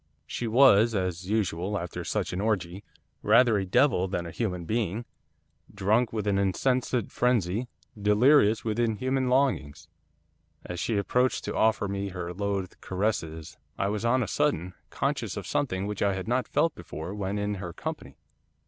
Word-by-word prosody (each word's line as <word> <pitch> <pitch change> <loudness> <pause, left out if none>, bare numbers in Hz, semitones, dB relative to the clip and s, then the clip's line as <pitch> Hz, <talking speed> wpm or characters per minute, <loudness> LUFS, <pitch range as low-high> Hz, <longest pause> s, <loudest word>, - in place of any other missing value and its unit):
She 120 +10 -4
was, 115 -2 +5
as 90 -1 -2
usual 100 -2 0
after 90 -2 -5
such - - -2
an 90 - -2
orgie, 100 -4 -1 0.4
rather 115 -5 +5
a 95 - -3
devil 125 -3 +3
than 90 -2 -3
a 85 - -6
human 90 -6 -3
being, 110 +2 -1 0.7
drunk 105 +4 +1
with 110 -2 -3
an 100 -1 +1
insensate 125 +4 0
frenzy, 120 -2 +1 0.3
delirious 110 +1 +4
with 110 0 -1
inhuman 130 +3 0
longings. 80 - 0 0.8
As 90 -1 -5
she 110 - 0
approached 125 +5 +1
to - - -4
offer 110 -1 +2
to 100 - -3
me 100 0 -3
her 90 -2 -5
loathed 100 -1 -3
caresses, 85 -5 -3 0.2
I 100 - 0
was 105 +1 -2
on 125 +2 +2
a - - -4
sudden 90 - 0 0.2
conscious - - -2
of - - -5
something 95 -9 -1
which 105 -1 -4
I 100 -1 +2
had 95 +1 -5
not 125 +2 0
felt 165 - +1
before 85 +1 -7
when 100 0 -3
in 105 0 -1
her 90 -2 -5
company. - - -7
105 Hz, 165 wpm, -27 LUFS, 95-120 Hz, 0.8 s, was